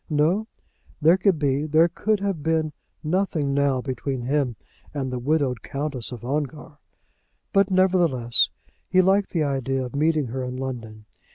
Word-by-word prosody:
No; 165 +8 +2 0.5
there 165 +3 +6
could 190 -2 +2
be, 145 0 0
there 160 +2 +5
could 210 +4 -1
have 195 -6 -2
been, 160 0 0 0.3
nothing 155 -4 0
now 140 -2 +2
between 130 0 -3
him 135 -2 0 0.4
and 135 -3 -2
the 125 - -3
widowed 135 -3 0
Countess 140 -4 -3
of 120 -1 -8
Ongar. 150 +2 -4 0.7
But, 195 -1 +4
nevertheless, 175 -11 +3 0.4
he 185 - +3
liked 195 +2 +3
the 165 -4 0
idea 135 -2 -1
of 125 - -8
meeting 155 0 +2
her 130 +2 -3
in 125 0 -4
London. 115 -5 -6
145 Hz, 155 wpm, -24 LUFS, 130-165 Hz, 0.7 s, there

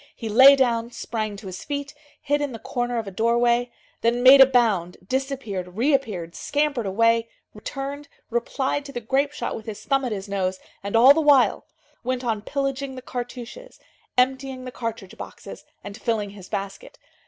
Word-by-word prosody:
He 225 - -6
lay 265 +6 +8
down, 235 -3 +1
sprang 220 -3 -4
to 200 - -11
his 185 -1 -7
feet, 285 0 -4 0.3
hid 290 0 0
in 285 -3 -2
the - - -5
corner 245 +1 -3
of 225 - -2
a 195 - -7
doorway, 235 +3 +2 0.3
then 235 +1 +1
made 270 +1 +9
a 265 - +10
bound, 215 -9 +1
disappeared, 230 -9 -3
reappeared, 230 - 0
scampered 285 - -1
away, 230 +3 +2 0.2
returned, 275 +6 -6 0.2
replied 265 +4 -1
to 280 - -8
the 245 - -4
grape 270 +5 0
shot 295 - -4
with 220 - -9
his 215 -2 -7
thumb 275 -1 +1
at 250 - -2
his 200 -1 -4
nose, 190 -2 -2 0.2
and, 200 +2 -4
all 250 +5 +8
the 320 - +1
while, 285 -4 +4 0.4
went 255 +1 -2
on 225 -3 -1
pillaging 275 +2 -3
the 255 - -9
cartouches, 250 - -7 0.4
emptying 260 0 0
the 255 - -6
cartridge 225 -6 -6
boxes, - - -10 0.2
and 205 +3 -9
filling 215 -4 -1
his 195 -3 -12
basket. 195 0 -6
240 Hz, 175 wpm, -24 LUFS, 215-270 Hz, 0.4 s, a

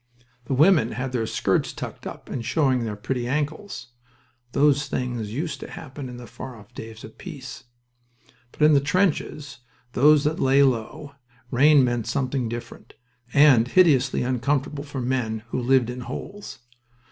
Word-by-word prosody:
The 135 - -1
women 155 - +4
had 125 +1 -3
their 115 -3 -1
skirts - - 0
tucked - - -7
up - - -9
and 120 - -4
showed 130 -1 +1
their 110 -3 -3
pretty 120 +3 -3
ankles. 150 +6 -3 0.6
(Those 145 +1 +3
things 120 -5 -3
used 140 +3 -3
to - - -8
happen 140 -3 -8
in 125 - -8
the 120 - -9
far 125 +3 -9
off 105 +1 -16
days 110 -2 -9
of 110 - -12
peace.) 140 -10 -9 0.9
But - - -2
in 155 0 +7
the 140 - +6
trenches, 150 -4 -1 0.3
those 145 +2 +5
that 155 +1 0
lay 135 +1 +4
low, 135 +3 -1 0.4
rain 145 +2 +6
meant 120 -3 -1
something 130 -3 -1
different, 120 +1 -8 0.4
and 135 -5 +6
hideously 145 -7 +3
uncomfortable 135 +3 -1
for 140 -2 -6
men 120 -4 -2
who 130 - -2
lived 125 -1 +3
in 125 - -7
holes. 200 +10 -7
130 Hz, 160 wpm, -24 LUFS, 120-145 Hz, 0.9 s, in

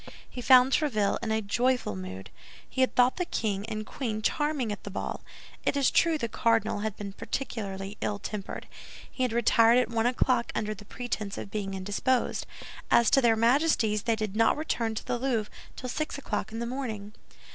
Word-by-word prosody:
He 250 - -7
found 255 +1 +7
Tréville 215 -10 +1
in 230 - -3
a 220 0 0
joyful 245 - +1
mood. 95 -2 -7 0.4
He 260 - -2
had 260 - +2
thought 250 +1 +4
the 360 - 0
king 210 - -2
and 215 -1 -4
queen 215 -5 -4
charming 295 -6 0
at 205 - -6
the - - -6
ball. 195 - -4 0.4
It - - +1
is 275 -2 +3
true 330 -2 +3
the 235 -6 -2
cardinal 225 -1 +1
had 215 -1 -3
been 200 -1 -6
particularly 200 -5 -4
ill 205 - -1
tempered. 200 -1 -6 0.4
He - - -6
had 250 -2 +2
retired 230 0 +5
at 250 - +2
one 230 0 +2
o'clock 245 -1 +1
under 215 0 -1
the 205 0 -12
pretense 215 -3 -4
of 195 - -7
being 195 -2 -3
indisposed. 205 +7 0 0.4
As 235 -2 +5
to 270 - +5
their 235 -2 +4
Majesties, 230 -3 +3
they 230 -1 +2
did 215 -2 -3
not 225 +4 +3
return 230 -7 -1
to - - -5
the 245 -1 -1
Louvre 235 -5 -1 0.2
till 255 - -6
six 305 +3 -3
o'clock 220 -6 -3
in 225 - -5
the 235 - -2
morning. 225 -5 -5
225 Hz, 195 wpm, -28 LUFS, 210-255 Hz, 0.4 s, found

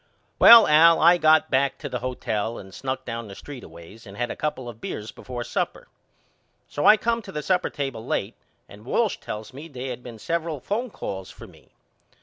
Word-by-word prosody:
Well 230 -2 +10
Al 165 +2 +6
I 175 +2 +6
got 155 0 +4
back 135 +1 +1
to 150 - -6
the 125 -3 -4
hotel 115 -3 -3
and 95 0 -11
snuck 130 +2 -4
down 115 -1 -5
the 100 - -10
street 140 +2 -10
a - - -11
ways 85 +8 -14
and 100 +1 -11
had 120 0 -2
a - - -5
couple 150 -5 -4
of 115 -1 -10
beers 105 +1 -6
before 125 -2 -7
supper. - - -4 0.8
So 145 - -1
I 210 +1 +8
come 230 +1 -1
to - - -11
the 150 0 -5
supper 185 +3 +1
table 135 -6 -5
late - - -2 0.3
and 105 +1 -14
Walsh 210 - 0
tells 105 +3 -8
me 145 +5 -9
they 130 -3 -7
had 125 -1 -6
been 120 -2 -10
several 165 +4 -3
phone 225 - -3
calls 95 - -6
for - - -12
me. - - -19
130 Hz, 210 wpm, -24 LUFS, 115-160 Hz, 0.8 s, Well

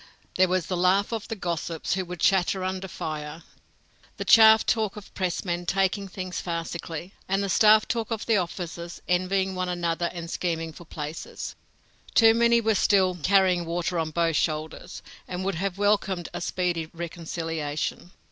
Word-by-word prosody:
There 185 0 +4
was 185 -1 0
the 185 - -2
laugh 185 +3 +3
talk 230 - -1
of - - -13
the 225 - -4
gossips, 170 -4 -3
who 190 +1 0
would 180 -1 -7
chatter 190 0 +2
under 190 +1 -3
fire, 155 -1 -6 0.7
the - - -4
chaff 220 -1 +7
talk 215 -3 0
of 210 -2 -9
the - - -19
press 185 0 -2
men 175 -1 -2
taking 195 +1 +1
things 185 -1 -5
farcically, 170 +1 -5 0.2
and 195 +1 +1
the 200 - -2
staff 215 +2 +5
talk 230 -2 -2
of 225 -2 -3
the 225 - +3
officers 170 -1 -4
envying 190 +1 +1
one 185 -1 -2
another 170 -1 -1
and 170 -1 -7
scheming 165 -2 -2
for 170 - -12
places. 150 0 -6 0.6
Too 225 -1 +7
many 235 0 +4
were 220 0 +2
still 190 -2 +3
"carrying 185 0 +3
water 170 +1 -2
on 160 -1 -1
both 165 -1 +1
shoulders," 155 -1 -3 0.2
and 185 +1 -4
would 195 - 0
have 195 -2 -2
welcomed 200 -4 +1
a - - -4
speedy 175 -3 -1
reconciliation. 165 -2 -4
180 Hz, 175 wpm, -26 LUFS, 170-195 Hz, 0.7 s, chaff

